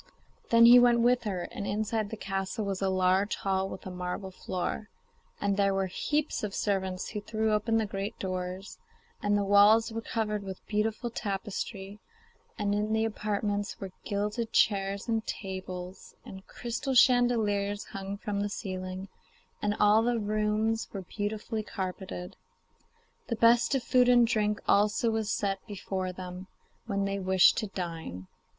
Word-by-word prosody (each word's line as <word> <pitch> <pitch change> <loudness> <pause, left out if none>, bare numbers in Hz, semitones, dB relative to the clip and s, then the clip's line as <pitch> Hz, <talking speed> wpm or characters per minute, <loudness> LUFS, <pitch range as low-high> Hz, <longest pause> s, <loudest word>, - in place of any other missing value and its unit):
Then 230 0 +7
he 245 +1 +10
went 240 -1 +5
with 245 0 +3
her, 185 -4 -2
and 200 - -5
inside 215 0 -1
the 220 - -6
castle 195 +2 -3
was 195 -1 -3
a 195 - +2
large 185 +2 +2
hall 190 0 -1
with - - -8
a 185 - -5
marble 180 +1 -4
floor, 185 +3 -4 0.5
and 200 -1 0
there 195 -1 +2
were 195 0 +1
heaps 295 - -1
of 205 -2 -3
servants 190 -2 -1
who 210 - -4
threw 220 +1 0
open 225 +2 +1
the 220 - +1
great 195 0 -4
doors, 185 0 -5 0.4
and 205 0 +2
the 205 - +1
walls 205 +3 +5
were 225 0 -3
covered 215 -2 -2
with 190 -2 -8
beautiful 220 +3 -1
tapestry, 200 -1 -4 0.6
and 205 -2 0
in 210 +1 0
the 220 0 +2
apartments 205 -1 -2
were 195 -1 -6
gilded 210 +3 -2
chairs 200 0 +2
and 225 -1 -1
tables, 185 -1 -6
and 190 0 -10
crystal 245 +3 -3
chandeliers 220 -5 +3
hung 195 0 -6
from 205 0 -3
the 205 - -1
ceiling, 185 -1 -5 0.5
and 205 0 0
all 210 +1 +5
the 240 +1 +1
rooms 215 +1 0
were 195 -2 -5
beautifully 215 +3 -3
carpeted. 190 -3 -5 0.9
The 230 - -1
best 235 +4 +4
of 265 - 0
food 250 0 +4
and 240 -1 +6
drink 210 -2 0
also 210 +3 +3
was 220 -1 -1
set 195 -1 -1
before 190 -2 -3
them 180 0 -8 0.4
when 200 0 0
they 200 0 -2
wished 190 -1 +5
to 215 - -3
dine. 165 - -6
205 Hz, 160 wpm, -29 LUFS, 190-220 Hz, 0.9 s, he